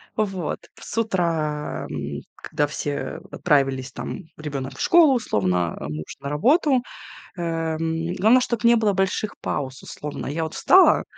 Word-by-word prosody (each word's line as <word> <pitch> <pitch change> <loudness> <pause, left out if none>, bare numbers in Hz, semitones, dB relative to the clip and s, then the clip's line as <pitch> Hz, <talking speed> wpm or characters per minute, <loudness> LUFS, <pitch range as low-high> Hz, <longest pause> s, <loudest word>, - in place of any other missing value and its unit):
Вот 195 -6 -2 0.2
с - - -8
утра, 165 -8 -1
м, 70 -1 -4
когда 145 0 -1
все 145 0 -4
отправились, 135 -4 +1
там - - -6
ребёнок 140 -3 -5
в - - -6
школу 320 -6 +6
условно, 90 - 0
а 70 - -5
муж 75 0 -6
на 140 - -4
работу, 260 - +3 0.6
эм, 165 0 -2
главное, 220 +7 +5
чтобы 235 -3 0
не 235 - +6
было 215 -2 +2
больших 195 +2 -1
пауз, 130 -1 -3
условно. 150 -1 -6
Я 160 +4 -2
вот 160 - -6
встала, 375 +1 +6
160 Hz, 145 wpm, -23 LUFS, 140-210 Hz, 0.6 s, школу